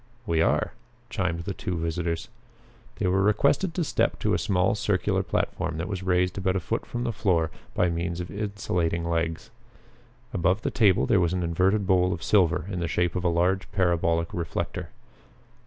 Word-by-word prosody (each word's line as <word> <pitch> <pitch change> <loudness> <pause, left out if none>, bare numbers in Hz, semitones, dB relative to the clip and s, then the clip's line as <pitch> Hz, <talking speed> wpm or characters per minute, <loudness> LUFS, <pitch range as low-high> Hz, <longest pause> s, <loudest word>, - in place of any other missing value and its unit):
"We 85 -6 +1
are," - - +1 0.4
chimed 90 -6 -1
the 100 +3 -4
two 90 -1 -3
visitors. 85 0 -2 0.7
They - - -3
were 95 +1 +3
requested 140 - +2
to 180 - +1
step - - 0
to - - +1
a - - +2
small 90 0 +2
circular 100 -1 0
platform 85 -1 -2
that 85 +3 -3
was 100 -3 -4
raised 90 0 +1
about 95 0 0
a - - +2
foot 85 - -3
from 120 0 -3
the 115 -1 -1
floor 85 -6 +1 0.2
by 90 - +2
means 85 +1 -2
of 90 - -5
insulating 90 -5 -1
legs. 80 0 -2 0.8
Above 95 +3 +1
the - - -1
table 100 -6 +4
there 105 - +3
was 85 -1 +1
an 90 -1 -1
inverted 95 +5 +2
bowl 90 -1 +3
of 85 - -6
silver 90 -4 +3
in 95 -3 -3
the 85 - -1
shape 90 +1 0
of 90 - -1
a 90 - +3
large 90 +3 +1
parabolic 85 -3 +1
reflector. 85 -3 -3
90 Hz, 185 wpm, -26 LUFS, 85-95 Hz, 0.8 s, table